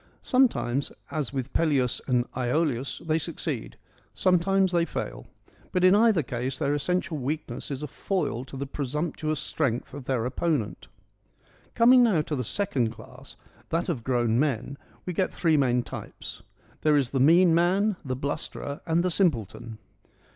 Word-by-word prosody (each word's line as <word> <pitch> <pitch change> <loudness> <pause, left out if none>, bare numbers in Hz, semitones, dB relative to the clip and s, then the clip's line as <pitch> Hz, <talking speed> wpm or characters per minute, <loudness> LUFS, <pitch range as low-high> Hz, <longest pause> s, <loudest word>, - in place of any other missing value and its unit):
Sometimes, 185 - +2 0.2
as 150 -5 -2
with 135 -1 -4
Peleus 140 -7 +1
and 125 -2 +2
Iolaus, 130 0 -1
they 160 0 +1
succeed; 155 -6 -4 0.4
sometimes 190 +1 +3
they 170 -2 +3
fail; - - -5 0.4
but 180 -1 +1
in 185 +1 +7
either 210 -5 +4
case 125 +1 -3
their 140 0 0
essential 165 +1 -1
weakness 140 -2 -4
is 140 0 -4
a - - -3
foil 145 - -2
to 135 +1 -9
the 140 - -3
presumptuous 150 +2 -2
strength 130 -8 -2
of 140 -2 -8
their 125 -3 0
opponent. 130 -3 -1 0.9
Coming 245 +2 +7
now 200 -10 +3
to 150 - -3
the 125 - -2
second 130 - 0
class, 115 - -12 0.3
that 170 +3 -1
of 135 -9 -2
grown 120 -2 +1
men, 140 -2 -1 0.3
we 180 - -3
get 185 +2 0
three 165 -3 +2
main 125 -4 +2
types: - - -8 0.4
there 150 -1 +4
is 135 -4 0
the 135 - 0
mean 165 +5 +6
man, 190 +5 +3
the 130 -3 -3
blusterer, 140 +1 -4
and 165 +1 +2
the 180 - +1
simpleton. 115 - 0
150 Hz, 155 wpm, -27 LUFS, 130-175 Hz, 0.9 s, in